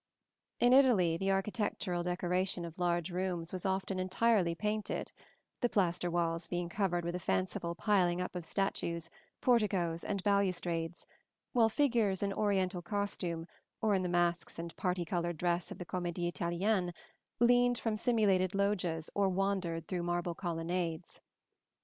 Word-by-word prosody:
In 245 +1 +5
Italy 230 -12 +5
the 195 +3 -1
architectural 195 -2 -1
decoration 180 0 0
of 165 +1 -9
large 175 -1 0
rooms 180 -2 -2
was 185 +1 -2
often 190 0 -1
entirely 185 -1 +2
painted 210 +3 -2
(see - - -26
Plate - - -26
XLIV), - - -34
the 245 - +2
plaster 180 -4 +1
walls 170 -1 0
being 175 -1 -2
covered 175 -3 0
with 170 - -2
a 180 - -2
fanciful 160 - -1
piling 180 -3 +2
up 180 0 -4
of 175 - -3
statues, 170 -2 -2 0.3
porticoes 195 -9 +2
and 200 -2 -2
balustrades, 180 -4 0 0.5
while 230 -2 +5
figures 225 -7 +2
in 200 0 0
Oriental 190 -3 0
costume, 175 -3 -2 0.3
or 220 -2 +2
in 190 - +2
the 180 - -1
masks 175 0 0
and 170 0 -6
parti 180 -1 -1
colored 175 -1 -2
dress 175 +1 0
of - - -7
the 180 - -6
Comédie 175 -1 -2
Italienne, 180 +1 0 0.4
leaned 245 0 +4
from 225 -2 -1
simulated 210 -5 +2
loggias 185 -5 0
or 200 -1 +2
wandered 185 -4 -1
through 180 -2 -2
marble 175 0 -1
colonnades. 170 -1 -3
180 Hz, 155 wpm, -33 LUFS, 175-200 Hz, 0.5 s, In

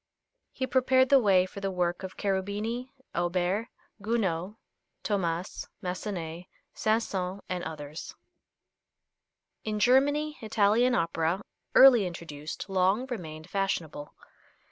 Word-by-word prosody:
He 260 - -2
prepared 260 0 +3
the 275 - +7
way 195 -5 +4
for 185 - -9
the 195 0 -2
work 175 -2 -1
of 190 -1 -7
Cherubini, 205 +6 -2 0.2
Auber, 180 +5 0 0.3
Gounod, 200 -4 -1 0.5
Thomas, 180 -3 -2 0.2
Massenet, 180 -2 -4 0.3
Saint 220 +1 +1
Saëns 190 0 -3
and 180 -1 -3
others. 150 0 -7 1.5
In 215 -1 -2
Germany, 290 +6 +3
Italian 220 +3 +3
opera, 165 +3 0 0.3
early 245 -7 +8
introduced, 155 -2 -7
long 195 +5 +2
remained 160 -8 -6
fashionable. 165 -7 -3
195 Hz, 105 wpm, -28 LUFS, 175-225 Hz, 1.5 s, early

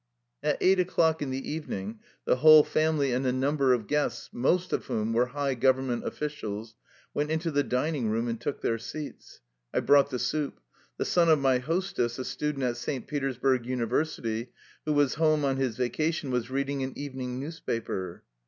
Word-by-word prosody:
At - - +1
eight 190 0 +4
o'clock 165 -3 +2
in 145 - -2
the 130 +1 -4
evening 110 -9 -5 0.3
the - - +3
whole 155 +2 +9
family 155 -4 +1
and 125 +2 0
a 130 - +2
number 135 +1 +2
of 120 -4 +2
guests, 150 +5 -1
most 175 +9 +1
of - - -1
whom 110 +1 -1
were 120 +2 +3
high 140 +1 -1
government 130 -1 +1
offlcials, 110 -7 -4 0.4
went 150 +1 -1
into 160 +1 -1
the 145 -1 +2
dining 130 -2 -1
room 115 +2 0
and 115 -1 -3
took 145 - -3
their 115 0 0
seats. 145 - -8 0.3
I - - +1
brought 140 0 +5
the 130 - -2
soup. 150 +3 -2 0.4
The - - -1
son 170 -2 +3
of 160 - +6
my 135 -2 +3
hostess, 165 -4 -1
a 130 - -4
student 150 -2 -2
at 120 -1 0
St. 130 +2 -4
Petersburg 135 -3 0
University, 120 -2 -1 0.4
who 155 - +1
was 145 -2 +3
home 155 -2 +3
on 135 -1 +1
his 130 -4 -1
va 125 -1 +1
cation, 155 -2 -1
was 125 -1 -1
reading 140 +1 -1
an 130 0 -3
evening 130 -3 -5
newspaper. 115 - -4
135 Hz, 185 wpm, -28 LUFS, 125-150 Hz, 0.4 s, whole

